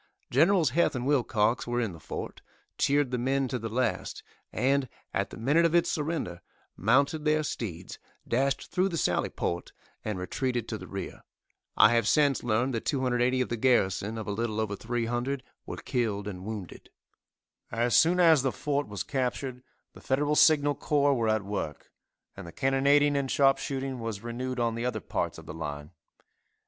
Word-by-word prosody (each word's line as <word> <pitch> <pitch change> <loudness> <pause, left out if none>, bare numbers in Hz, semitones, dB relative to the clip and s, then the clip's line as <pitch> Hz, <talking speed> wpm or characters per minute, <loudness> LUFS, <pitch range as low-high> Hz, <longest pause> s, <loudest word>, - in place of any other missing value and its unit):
Generals 160 +1 +4
Heth 165 0 +2
and 125 0 -3
Wilcox 120 -5 +1
were 120 0 0
in 115 -5 -1
the 85 - -11
fort, - - -7 0.4
cheered 145 -2 +2
the 125 - -1
men 135 +2 +1
to 125 - -2
the 115 0 -4
last, 125 +3 -2 0.3
and, 135 +2 +1 0.2
at 100 0 -1
the - - -10
minute 145 +9 +3
of 170 0 +2
its 170 - +3
surrender, 150 - -3 0.3
mounted 140 - +2
their 155 0 +2
steeds, 100 - -5 0.3
dashed 135 +3 0
through 185 +2 +2
the 170 - -3
sally - - +1
port 85 0 -3 0.3
and 105 -3 -3
retreated 120 +5 -2
to 110 - -4
the - - -9
rear. 95 -2 -6 0.6
I 115 - +7
have 115 -3 +2
since 145 -1 +3
learned 120 +3 +1
that 115 - -2
280 130 -2 +1
of 125 - -1
the 120 - -2
garrison, 110 -3 +1
of 110 - -5
a - - -1
little 110 +1 -2
over 105 -2 -1
300, 120 +4 -2 0.2
were - - -5
killed 105 -5 -2
and 95 -3 -6
wounded. 105 -6 -7 0.8
As 115 -1 +1
soon 175 +3 +5
as 165 -5 +6
the 135 0 0
fort 145 +1 -2
was 100 -2 -4
captured 130 -1 -3 0.3
the - - -14
Federal 145 +3 +1
signal 145 -2 +5
corps 145 0 +2
were 115 -4 0
at 110 -2 +1
work, 100 -7 -5 0.4
and 95 -3 -9
the - - -8
cannonading 140 - +3
and 140 -1 0
sharpshooting 135 -1 +1
was 115 -2 -5
renewed 125 +2 -4
on 115 -1 +1
the 115 +1 -4
other 125 - -1
parts - - -3
of - - -11
the - - -7
line. 75 -1 -6
125 Hz, 180 wpm, -28 LUFS, 110-140 Hz, 0.8 s, I